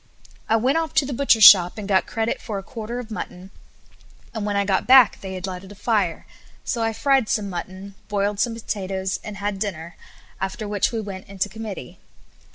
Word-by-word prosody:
I 225 - +4
went 260 +8 +2
off 325 -1 -4
to 280 - +4
the 275 - -4
butcher's 235 -4 +3
shop, 180 -2 +9
and 210 -2 -6
got 190 -3 +2
credit 225 0 -2
for 215 -4 -5
a 195 - -6
quarter 230 +2 -6
of 240 -2 -7
mutton; 190 -2 -7 0.8
and 215 -2 -3
when 205 - -1
I 200 0 +1
got 190 -1 0
back 255 -4 +6
they 190 -1 -6
had 185 0 -5
lighted 190 +1 -7
a - - -11
fire, 205 -5 -1 0.4
so 235 - -2
I 225 0 +1
fried 265 +1 +1
some 205 -3 -1
mutton, 185 +3 -7
boiled 205 0 -1
some 230 +2 0
potatoes, 190 -4 -3
and 210 -2 -7
had 200 -1 -3
dinner; 170 -5 -5 0.4
after 190 +3 -4
which 205 -1 0
we 230 - -2
went 195 -3 -7
into 195 +1 -3
committee. 210 - -8
205 Hz, 200 wpm, -23 LUFS, 190-225 Hz, 0.8 s, shop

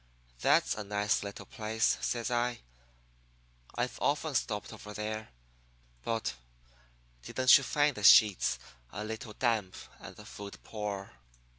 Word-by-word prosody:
"'That's - - +3
a 105 - -5
nice 105 +1 0
little 100 0 -7
place,' 110 -2 0
says 120 0 -2
I. 120 0 0 1.1
'I've 125 +1 -2
often 150 +1 0
stopped 105 -4 -2
over 105 -1 -10
there. 110 +1 -4 0.7
But 115 -8 -2 0.9
didn't 130 - +5
you 135 - +4
find 145 +1 +1
the 105 - -6
sheets 105 0 +6 0.3
a 105 - -5
little 110 +1 -6
damp 110 -6 0 0.2
and - - -10
the - - -13
food 100 -1 -9
poor? 105 -3 -5
110 Hz, 130 wpm, -31 LUFS, 105-120 Hz, 1.1 s, sheets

